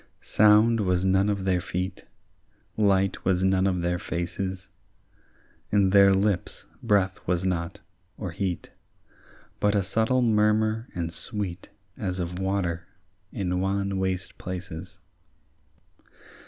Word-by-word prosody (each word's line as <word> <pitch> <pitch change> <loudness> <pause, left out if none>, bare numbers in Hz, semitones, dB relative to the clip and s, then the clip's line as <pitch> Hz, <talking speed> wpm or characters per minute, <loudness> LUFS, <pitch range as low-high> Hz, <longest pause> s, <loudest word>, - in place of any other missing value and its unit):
Sound 110 +2 +4
was 90 -2 +1
none 95 +2 +3
of 100 -2 -1
their 90 -2 +2
feet, 90 +2 -4 0.7
Light 100 -2 +2
was 95 -1 +1
none 95 0 +3
of 90 -2 0
their 90 0 0
faces; 95 +2 -4 1.0
In 100 -2 +3
their 100 0 +7
lips 95 -1 0 0.2
breath 100 -4 +1
was 90 +1 0
not, 85 -1 -2 0.4
or 95 -4 -5
heat, 90 +1 -3 0.9
But 105 0 +2
a 100 - +2
subtle 110 +6 +1
murmur 110 +1 +2
and 85 -1 -3
sweet 100 -4 -3 0.3
As 90 0 -2
of 90 +1 -4
water 95 -3 -1 0.4
in 90 -2 -2
wan 100 0 -1
waste 95 0 -3
places. 90 0 -7
95 Hz, 120 wpm, -26 LUFS, 90-100 Hz, 1.0 s, their